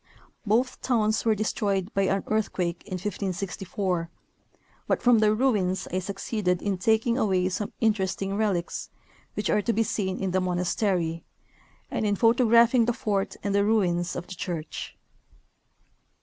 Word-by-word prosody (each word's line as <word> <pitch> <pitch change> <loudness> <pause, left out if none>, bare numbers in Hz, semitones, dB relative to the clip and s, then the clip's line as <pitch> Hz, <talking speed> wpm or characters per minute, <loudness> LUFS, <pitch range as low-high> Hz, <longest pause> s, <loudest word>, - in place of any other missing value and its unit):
Both 240 +5 +1
towns 220 -4 +1
were 220 -1 +4
destroyed 205 -2 -1
by 195 -1 +2
an 195 +1 0
earthquake 185 -5 -1
in 195 - -6
1564, 185 -2 -3 0.8
but - - +1
from 245 -2 +5
their 215 0 +4
ruins 210 -7 +1
I 185 - +1
succeeded 195 -1 -2
in 195 -2 -2
taking 225 +4 +2
away 185 -5 +2
some 200 +2 -3
interesting 195 -3 0
relics, 200 -5 -1 0.5
which 210 - -1
are 210 - +3
to 230 - 0
be 225 - +2
seen 190 -4 -2
in 190 -1 -1
the 185 +1 +1
monastery, 180 -2 0 0.7
and - - -1
in 205 -1 +2
photographing 235 +1 +5
the 240 - +1
fort 200 -3 -1
and 200 - -1
the 200 0 +3
ruins 180 -5 +1
of 175 - -4
the - - -8
church. 170 -3 -5
200 Hz, 150 wpm, -26 LUFS, 185-220 Hz, 0.8 s, from